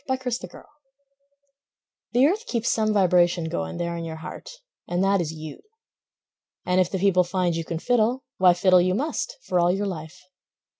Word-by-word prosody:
Fiddler 260 -1 -2
Jones 180 -7 -6 1.5
The 250 +3 +5
earth 410 +9 0
keeps 235 -1 0
some 215 -1 +1
vibration 180 -3 +3
going 80 - -4
There 170 0 -3
in 170 - -5
your 165 -1 -6
heart, 160 +3 -9 0.4
and 175 +2 0
that 195 -1 +2
is 160 -2 -3
you. 155 -1 -9 1.1
And 180 +1 +3
if 180 - 0
the 190 - -2
people 185 -1 +3
find 180 -1 -1
you 165 - -2
can 165 0 -4
fiddle, 245 +6 +1
Why, 180 -2 +5
fiddle 185 0 +5
you 185 +1 +1
must, 320 - -3
for 180 - 0
all 175 0 +3
your 195 +3 -1
life. 170 -2 -6
185 Hz, 180 wpm, -24 LUFS, 175-220 Hz, 1.5 s, The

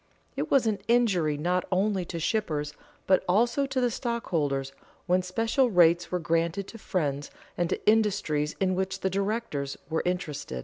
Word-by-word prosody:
It - - -2
was 270 -4 +4
an 215 -2 0
injury 195 -11 +2
not 180 +4 0
only 190 0 +1
to 170 0 -5
shippers, 155 -6 -1 0.3
but 185 -1 +3
also 235 +8 +2
to 270 -1 -1
the 245 -1 +1
stockholders, 150 - -2 0.3
when 180 0 +2
special 225 +8 +1
rates 175 -3 +4
were 180 - +1
granted 165 +3 0
to 225 - -10
friends 145 -8 -2 0.3
and 175 -1 0
to - - -3
industries 205 -9 +2
in 185 -1 +1
which 190 +1 -2
the 190 - 0
directors 195 -8 -2
were 160 - +1
interested. 150 - -3
185 Hz, 165 wpm, -27 LUFS, 160-215 Hz, 0.3 s, was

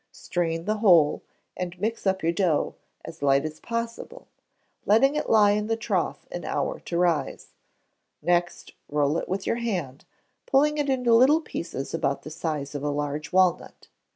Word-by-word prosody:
Strain 165 -1 -3
the 215 +1 0
whole, 175 -8 +5 0.3
and 180 -1 -5
mix 220 +1 -2
up 190 -1 0
your 165 - +2
dough 170 -3 0 0.3
as - - -10
light 140 0 +3
as 155 0 -6
possible, 230 - -5 0.6
letting 270 +8 +4
it 300 - -2
lie 210 -2 +5
in 210 +1 0
the 225 - +1
trough 225 - -2
an - - -5
hour - - -2
to 170 - -4
rise; 170 -5 -1 0.7
next 175 +2 -1 0.2
roll 150 +2 +1
it - - -7
with 190 +2 -2
your - - 0
hand, 180 - -4 0.4
pulling 300 +2 +3
it 290 -1 0
into 250 -3 +2
little 260 +7 +6
pieces 165 - -6
about 140 0 -1
the 155 - -8
size 150 -3 -4
of 145 - -4
a 150 - 0
large 145 0 -3
walnut. 185 -1 +1
180 Hz, 170 wpm, -25 LUFS, 150-230 Hz, 0.7 s, little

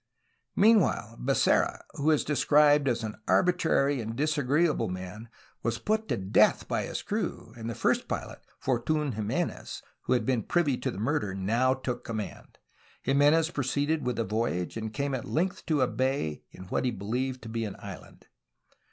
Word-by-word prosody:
Meanwhile, 195 - +3
Becerra, 135 +1 +2
who 150 +2 0
is 155 -2 +3
described 145 0 +4
as 120 -3 0
an 110 0 -6
arbitrary 160 -7 +2
and 115 +1 -5
disagreeable 150 -1 +1
man, 95 +5 -7 0.3
was 115 0 -1
put 220 - -1
to 120 - 0
death 95 0 +3
by - - -1
his - - -4
crew, 200 - -3
and 115 -1 -6
the 115 - -4
first - - +1
pilot, - - -5 0.2
Fortun 140 +3 0
Jimenez, 105 0 -3 0.2
who - - +2
had 120 -3 +1
been 125 -2 +1
privy 150 - +1
to - - -2
the - - -6
mur 140 +9 +1
der, 100 -3 -4
now 115 +7 +2
took 125 -2 -4
command. 110 -2 -6 0.5
Jimenez 145 +4 +4
proceeded 145 +3 0
with 125 -1 -1
the 115 - 0
voyage 105 -4 -2
and 110 -1 -4
came 140 +3 -2
at 130 - -2
length 185 +4 -1
to 155 -5 +2
a 130 - +4
bay 130 - -1
in - - -11
what 95 - -2
he 130 - +2
believed 125 +4 -3
to 115 - -7
be 115 0 -2
an 105 -3 -4
island. - - -11
130 Hz, 175 wpm, -28 LUFS, 110-150 Hz, 0.5 s, described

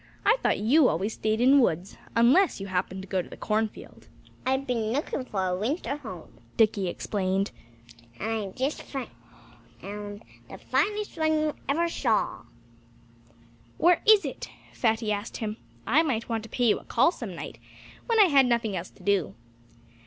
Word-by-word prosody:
I 430 +3 +6
thought - - +2
you 255 +7 +4
always 195 +7 -1
stayed 220 +1 -1
in 255 +2 +6
the 285 - +7
woods 180 -4 0 0.2
unless 255 - +4
you 195 - -5
happened 190 0 -2
to - - -11
go 190 -1 0
to - - -12
the - - -10
cornfield." 215 0 -3 0.4
"I've 265 +1 +1
been 230 -4 -1
looking 270 0 -2
for 195 -6 -2
a 180 -1 0
winter 275 - -2
home," 200 - -10 0.2
Dickie 205 -4 +3
explained. 190 +2 -1 0.7
"And 220 -1 -2
I've - - -16
just 270 +4 -2
found 270 -3 -6 1.4
the - - -9
finest 415 -4 -1
one 315 0 +2
you 305 -1 0
ever 335 +5 +2
saw." 240 -9 0 1.3
"Where 345 0 +4
is 430 -2 +7
it!" - - -6 0.2
Fatty 225 -2 0
asked 205 +2 -3
him. 215 -1 -4 0.3
"I 280 +8 +4
might 255 -8 -1
want 225 -2 -2
to - - -12
pay 245 - 0
you - - +2
a - - -16
call 250 +8 +3
some 225 - -7
night - - -8 0.5
when 460 -2 +2
I 415 - +9
had 275 -7 +5
nothing 235 -4 0
else 180 0 -4
to - - -19
do." 190 - +1
230 Hz, 175 wpm, -27 LUFS, 200-285 Hz, 1.4 s, I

